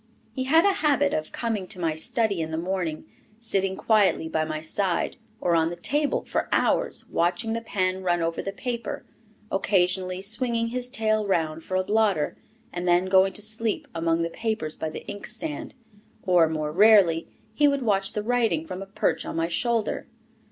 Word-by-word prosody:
He 260 -1 -2
had 320 +6 +5
a 400 - +4
habit 285 -2 +2
of 155 0 -2
coming 220 -6 -2
to 190 -2 -7
my 165 -2 0
study 200 +4 +2
in 160 - -3
the 160 - -3
morning, 175 -2 -3 0.3
sitting 195 -4 0
quietly 205 -7 +2
by 160 0 0
my 155 0 -3
side 175 +3 -1 0.2
or 175 - +1
on 165 0 +3
the 175 - -5
table 290 - 0
for - - -2
hours, - - +1
watching 185 +7 0
the 230 - -2
pen 185 -4 -1
run 175 -2 +1
over 165 0 -1
the 195 - -4
paper, 235 +2 -4 0.5
occasionally 185 -1 +1
swinging 230 +3 0
his 250 +1 -2
tail 215 -4 0
round 160 -4 0
for 185 - -4
a 185 - +1
blotter, 205 -6 +1 0.4
and 175 0 -3
then 175 +1 +4
going 190 0 +4
to 210 - -3
sleep 220 0 -1
among 165 0 0
the 165 - -3
papers 220 -9 -3
by 160 - -3
the 155 - -8
inkstand. 300 +8 -5 0.5
Or, 175 -4 +4
more 155 -1 -2
rarely, 190 -3 +5 0.3
he 295 +6 +4
would 280 -2 +1
watch 195 -3 +1
the 210 - -2
writing 225 -9 +1
from 185 +3 -6
a 195 - -7
perch 195 - -1
on - - -6
my 165 0 0
shoulder. 230 +3 -1
195 Hz, 185 wpm, -25 LUFS, 170-225 Hz, 0.5 s, had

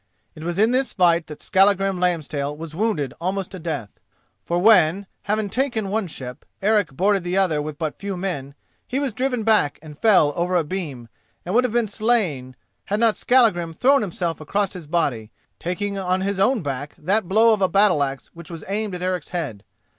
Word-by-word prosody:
It 155 - -10
was 175 +1 -3
in 220 +3 +4
this 260 -1 0
fight 170 -3 +3
that 150 - -9
Skallagrim 195 -1 +3
Lambstail 150 -5 -1
was 160 -1 -8
wounded 165 - -1
almost 190 +1 -2
to 185 - -7
death. 150 -11 -5 0.4
For 170 - -1
when, 185 -1 +4 0.2
having 210 0 0
taken 230 -3 -1
one 210 -1 -1
ship, 125 -6 -8 0.2
Eric 205 -6 +2
boarded 195 0 +2
the 180 +2 -1
other 170 -6 +2
with 150 0 -6
but 155 -2 -4
few 200 -2 -4
men, 145 -7 -4 0.3
he 255 - -2
was 275 -5 -2
driven 250 0 -1
back 210 -9 +3
and 150 -1 -11
fell 160 -6 +4
over 180 +1 0
a 175 - +3
beam, 150 -8 -5 0.4
and 180 - -3
would 245 +2 +4
have 240 - -2
been 240 -1 +2
slain, 205 - -1 0.3
had 205 +1 -1
not 225 -2 +3
Skallagrim 185 -10 +2
thrown 275 - +4
himself 170 -5 -3
across 200 +6 -1
his 175 -5 -8
body, 140 -10 -1 0.3
taking 200 +3 -3
on 185 0 0
his 195 0 -2
own 230 0 +2
back 145 +1 -4
that 190 +4 0
blow 220 +3 +5
of 210 - -1
a 190 - +3
battle 195 -4 +4
axe 135 -1 -2
which 170 -2 -11
was 165 -3 -8
aimed 205 0 -2
at 180 - -6
Eric's 180 -3 -2
head. 140 - -4
185 Hz, 200 wpm, -22 LUFS, 155-210 Hz, 0.4 s, blow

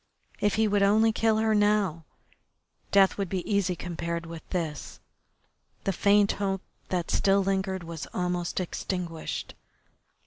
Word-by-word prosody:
If 205 - +2
he 220 0 +3
would 205 -1 +2
only 215 +3 +4
kill 220 0 +2
her 220 0 +2
now. 205 -6 +2 0.9
Death 195 0 +4
would 195 -3 -1
be 185 -1 -3
easy 200 -3 +1
compared 170 -1 -4
with 165 -1 -8
this. 165 -5 -4 0.8
The 195 - 0
faint 200 +2 +4
hope 195 -2 -2 0.3
that 175 -2 -1
still 195 0 +3
lingered 190 -1 -1
was 165 -2 -6
almost 180 -1 -1
extinguished. 175 -2 -4
190 Hz, 135 wpm, -27 LUFS, 175-205 Hz, 0.9 s, only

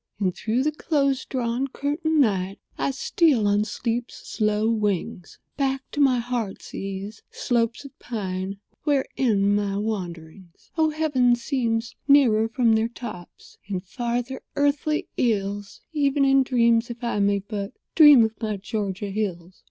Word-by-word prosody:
"And 185 -3 +1
through 230 +6 0
the 305 - +1
close 280 -3 0
drawn, 250 +1 -1
curtained 300 +3 0
night 195 -5 0 0.2
I - - -1
steal 270 -3 +2
on 205 +1 +2
sleep's 230 +2 -3
slow 215 0 0
wings 205 -7 -2 0.2
Back 270 -1 0
to 295 - -1
my 265 -3 +4
heart's 235 -4 -4
ease—slopes 215 +5 -3
of 275 - -13
pine— 195 -4 -4 0.3
Where 285 -3 +2
end 205 -5 +2
my 200 -1 -1
wanderings. 180 -4 -6
Oh, 320 -1 +3
heaven 285 -6 +2
seems 235 -2 -1
nearer 240 -6 +5
from 235 -1 +2
their 220 +1 +2
tops— 215 -7 -10
And 190 -3 -3
farther 240 +5 -3
earthly 290 +2 +1
ills— 205 -3 -1
Even 280 -2 +2
in 270 0 +5
dreams, 235 -2 +2
if 240 +1 -8
I 235 -3 -1
may 200 0 +3
but 200 0 -5 0.2
Dream 295 -6 +8
of 220 - -3
my 215 -2 -2
Georgia 200 0 -4
hills. 185 -4 -4
230 Hz, 145 wpm, -24 LUFS, 200-265 Hz, 0.3 s, Dream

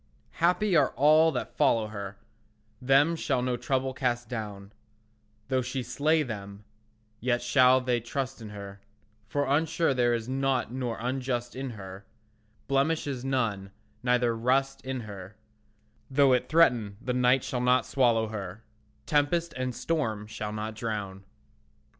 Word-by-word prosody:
Happy 180 +3 +2
are 145 -4 +4
all 155 +3 +5
they 125 - -1
that - - -12
follow 115 -2 +3
her; 100 -2 -7 0.6
Them 140 +6 +4
shall 130 -6 -1
no 125 -1 0
trouble 130 +2 -1
cast 120 -2 -1
down; 105 -4 -6 0.7
Though 130 -1 +1
she 125 +1 -3
slay 155 +5 +1
them, 100 -4 -7 0.6
yet 120 +1 0
shall 130 +1 +5
they 125 -1 0
trust 130 +2 -4
in 110 - -8
her, 100 -1 -9 0.5
For 145 +5 0
unsure 155 +2 +1
there 120 -2 +2
is 115 0 -4
nought 130 -3 0
nor 125 -3 -3
unjust 125 -1 -2
in 135 0 -4
her, 95 0 -9 0.6
Blemish 140 +4 +1
is 135 -4 -4
none, 115 -8 -1 0.3
neither 125 -1 +2
rust 135 +4 0
in 130 -1 -4
her; 100 -2 -9 0.7
Though 135 -1 +4
it 125 - 0
threaten, 120 -11 +3
the 125 +1 -3
night 125 +1 +3
shall 125 -3 -3
not 125 +1 +3
swallow 115 -4 +2
her, 100 0 -6 0.4
Tempest 160 +3 +1
and 130 -1 -3
storm 115 -11 -2
shall 105 -1 -5
not 110 +1 -4
drown. 105 -4 -5
125 Hz, 145 wpm, -28 LUFS, 110-135 Hz, 0.7 s, all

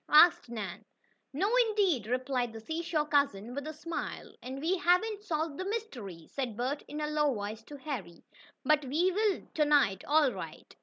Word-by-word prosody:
asked 310 -3 +7
Nan. 210 -7 -5 0.5
"No, 330 +9 +1 0.2
indeed," 380 - +2
replied 250 -1 0
the 225 - -7
seashore 320 +4 -1
cousin, 260 -7 +1
with 285 +3 -4
a - - -3
smile. 330 +2 -5
"And 260 +2 -6
we 330 +6 +1
haven't 400 +5 +2
solved 315 -5 -2
the 375 - -2
mystery," 245 - -5
said 250 -6 -4
Bert 260 +4 -1
in 295 - -5
a 300 - 0
low 300 -1 +2
voice 210 +2 -4
to 290 - -9
Harry. 235 - -6 0.4
"But 305 -1 +4
we 315 +8 +2
will 410 0 +1
to 310 - +3
night, 280 -11 +3
all 295 -2 +4
right." 165 -7 -8
290 Hz, 175 wpm, -31 LUFS, 240-330 Hz, 0.5 s, asked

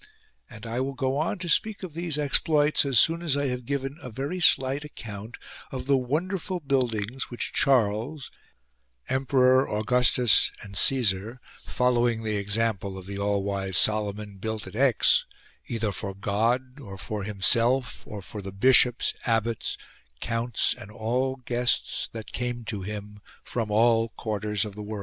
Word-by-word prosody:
And 110 -4 -11
I 115 +2 -3
will 135 +1 -2
go 130 +1 -1
on 160 +7 -1
to 180 -1 -6
speak 205 +5 +1
of 180 -5 -7
these 165 -2 -2
exploits 150 +1 +3
as 135 -4 +4
soon 165 +1 +3
as 155 -5 0
I 140 -1 0
have 125 -1 -4
given 140 +2 -3
a 125 - -8
very 140 +10 -4
slight 135 -3 +3
account 110 -5 -8 0.3
of 130 - -5
the 140 +1 +3
wonderful 175 +8 -2
buildings 130 -4 0
which 120 - -3
Charles 125 +3 +1 0.8
(Emperor, 130 0 +3
Augustus 120 +1 +3
and 100 -2 -10
Caesar), 115 -1 +2 0.3
following 120 -2 +1
the 110 -1 -1
example 100 -1 -1
of 95 - -9
the 100 +1 -6
all 100 -1 0
wise 95 -2 -1
Solomon, 105 -1 +1
built 110 +1 -4
at 95 +2 -10
Aix, 130 -1 +4 0.4
either 115 -3 -2
for 100 -1 -5
God, 120 +7 -1
or 100 -8 -9
for 105 +2 -5
himself, 115 +5 +2
or 105 -2 -7
for 105 +2 -6
the 95 0 -7
bishops, 125 +4 +4
abbots, 115 -1 -1 0.4
counts 115 0 0
and 100 - -11
all 125 +5 -1
guests 125 -1 -1
that 110 -2 -8
came 120 -1 -3
to 105 -4 -4
him 105 +1 -7 0.2
from 115 -3 -3
all 115 +1 +3
quarters 105 -1 -2
of 105 - -7
the 105 - -8
world. 105 0 -6
120 Hz, 160 wpm, -26 LUFS, 105-135 Hz, 0.8 s, as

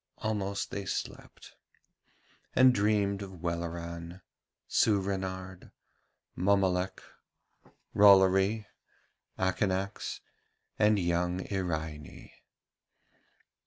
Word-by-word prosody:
Almost 100 -2 -3
they 100 -1 -4
slept, - - -6 1.0
and 130 0 +7
dreamed 100 -2 +1
of 95 -4 -9
Welleran, 85 +1 -5 0.5
Soorenard, 95 -3 -1 0.6
Mommolek, 95 -1 +1 0.9
Rollory, 100 +1 +5 0.7
Akanax, 95 +1 -1 0.6
and 105 0 +4
young 90 0 0
Iraine. 80 -6 -4
95 Hz, 60 wpm, -30 LUFS, 90-100 Hz, 1.0 s, and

